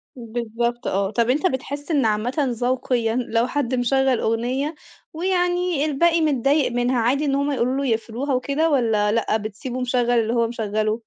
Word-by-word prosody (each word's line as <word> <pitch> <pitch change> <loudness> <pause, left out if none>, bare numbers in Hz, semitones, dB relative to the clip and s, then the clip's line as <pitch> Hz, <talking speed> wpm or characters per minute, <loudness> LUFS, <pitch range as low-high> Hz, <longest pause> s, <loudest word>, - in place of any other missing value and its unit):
بالضبط 235 0 -3
آه. 195 +1 0
طب 235 +2 +1
أنت 295 +8 +2
بتحِس 285 +1 -4
إن 285 -6 +2
عامةً 215 +3 0
ذوقيًا 245 -2 0
لو 235 -1 0
حد 260 -2 -1
مشغّل 260 +1 +2
أغنية 255 +7 -1 0.4
ويعني 355 -2 0
الباقي 330 +3 +2
متضايق 280 -2 +2
منها، 245 +1 +1
عادي 260 +6 +1
إن 275 -1 +1
هم 280 +1 0
يقولوا 255 -1 0
له 275 - -1
يقفلوها 235 +4 -1
وكده 280 +5 +1
والّا 225 -7 +2
لأ، 220 0 +1
بتسيبه 220 +4 -6
مشغّل 245 -1 +1
اللي 225 0 0
هو 235 -1 +2
مشغّله؟ 215 -1 -1
250 Hz, 165 wpm, -22 LUFS, 230-280 Hz, 0.4 s, أنت